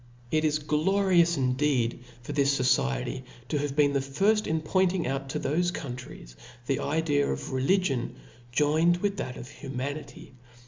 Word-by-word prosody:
It 155 0 +2
is 155 -1 +2
glorious 170 +3 +2
indeed 130 -2 +1 0.2
for 135 - -6
this 140 -1 +3
Society 130 - +1 0.3
to 150 - 0
have 140 -1 -2
been 145 -1 +4
the 140 - +2
firft 195 +11 +1
in 160 0 +1
pointing 185 +2 +1
out 135 +1 -3
to - - -2
thofe 175 +4 0
countries 125 - -8 0.3
the 135 +1 0
idea 145 -1 +1
of 65 - -4
religion 135 -1 +1 0.4
joined 155 +6 +3
with 200 +2 -1
that 125 - -4
of 120 - -8
humanity. 140 +3 -6
145 Hz, 150 wpm, -28 LUFS, 130-165 Hz, 0.4 s, been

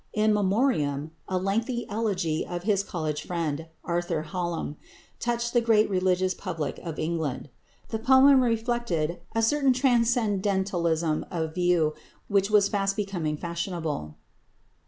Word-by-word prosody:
"In 215 0 +3
Memoriam," 190 - +1 0.2
a 185 - -1
lengthy 225 +6 -1
elegy 195 -7 -1
on 175 0 -4
his 200 0 +2
college 155 -6 -3
friend, 165 -3 -2 0.2
Arthur 175 -2 -1
Hallam, 170 -3 -3 0.4
touched 235 0 -1
the 240 - +4
great 220 -2 +3
religious 185 0 +2
public 165 -8 -4
of 165 -3 -6
England. 155 -4 -2 0.4
The 220 - -2
poem 265 +3 +6
reflected 225 -9 0
a 225 - +2
certain 275 +2 +3
transcendentalism 200 - +1
of 160 -2 -3
view 175 -3 +2 0.4
which 200 0 +2
was 210 -2 +5
fast 195 -1 0
becoming 180 -8 -2
fashionable. 170 - -4
185 Hz, 125 wpm, -27 LUFS, 165-225 Hz, 0.4 s, poem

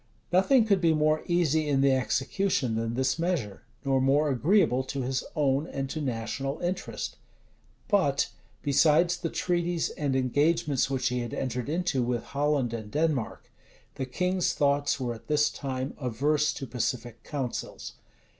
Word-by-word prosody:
Nothing 220 +6 +5
could 200 -4 +2
be 165 -2 +4
more 155 0 +2
easy 160 -3 +2
in 135 -2 +2
the 135 0 +4
execution 130 - 0
than 115 +1 -2
this 130 +4 0
measure, 165 - -1 0.2
nor 135 -1 +2
more 145 +3 +3
agreeable 130 - +3
to 135 0 -3
his 130 0 -1
own 145 +1 +1
and 135 -3 -4
to 155 - -3
national 135 +2 -3
interest. 180 +2 -3 0.7
But, 145 - +2 0.3
besides 160 +4 +4
the 170 -2 -3
treaties 175 -1 -1
and 140 -3 -1
engagements 145 +2 +1
which 130 -2 0
he 125 0 -1
had 120 -1 -4
entered 125 0 -3
into 165 -4 0
with 120 -1 -1
Holland 140 -4 0
and 110 -2 -5
Denmark, 150 -3 -1 0.4
the 130 - -4
king's 180 +6 0
thoughts 140 0 +1
were 125 -2 -2
at 115 - -13
this 150 -1 +2
time 130 -1 -4
averse 145 +4 +1
to 135 - -5
pacific 120 -2 -3
counsels. 135 -5 -5
140 Hz, 155 wpm, -28 LUFS, 130-160 Hz, 0.7 s, Nothing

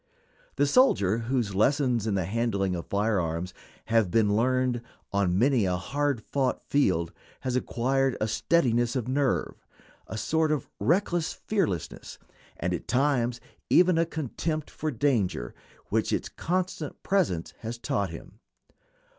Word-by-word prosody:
The 145 - +3
soldier 115 - +4
whose 115 -3 -1
lessons 125 +1 +2
in 105 - +1
the 95 -3 0
handling 100 -2 0
of 85 - -6
fire 105 0 +1
arms 85 +2 -3 0.3
have 115 -4 +2
been 105 +1 +3
learned 125 +1 +1 0.3
on 95 -3 +2
many 125 -1 +3
a 90 -1 +1
hard 140 +3 -1
fought 135 -2 -1
field 90 - +1 0.3
has 130 -1 -2
acquired 130 +1 0
a 110 - 0
steadiness 120 -3 +2
of 125 -3 -1
nerve, 135 0 0 0.4
a 110 - -5
sort 160 +6 +1
of 150 - -1
reckless 175 -1 +1
fearlessness, 180 - -3 0.4
and, 90 +1 -1
at 85 - -4
times, 125 -2 +1 0.3
even 180 -2 +5
a 165 - +2
contempt 155 0 -3
for 155 - -3
danger 115 - 0 0.4
which - - +1
its - - -1
constant 180 -4 -3
presence 160 - 0
has 115 +1 -5
taught 120 -6 -1
him. 85 +5 -11
120 Hz, 140 wpm, -27 LUFS, 100-145 Hz, 0.4 s, even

